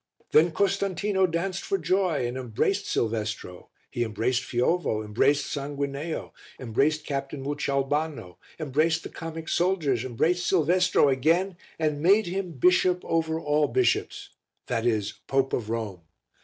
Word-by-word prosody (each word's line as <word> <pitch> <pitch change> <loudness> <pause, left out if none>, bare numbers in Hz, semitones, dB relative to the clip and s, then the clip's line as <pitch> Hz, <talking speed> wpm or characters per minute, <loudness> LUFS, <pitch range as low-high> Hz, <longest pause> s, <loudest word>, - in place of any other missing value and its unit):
Then 160 +3 +6
Costantino 195 +1 +1
danced 175 +3 -2
for 395 - -1
joy 185 - +1
and 120 +1 -3
embraced 125 -5 -1
Silvestro, 110 -5 -3 0.2
he 120 - -1
embraced 115 +3 0
Fiovo, 120 -2 0
embraced 140 +7 +2
Sanguineo, 140 +2 -4 0.3
embraced 140 +6 0
Captain 140 -1 -4
Mucioalbano, 140 - -2 0.2
embraced 155 +2 +1
the - - -7
comic 165 -1 -7
soldiers, 160 - +1
embraced 165 +8 0
Silvestro 180 -1 +3
again 165 +8 +2 0.2
and 150 -2 -1
made 200 +6 +5
him 180 -1 -3
bishop 180 +5 +3
over 160 -1 0
all 150 -1 +1
bishops 125 -1 0 0.4
that 115 -1 -1
is 105 -3 -1
Pope 135 0 +1
of 110 -3 -2
Rome. 110 -6 -3
145 Hz, 130 wpm, -26 LUFS, 125-175 Hz, 0.4 s, Then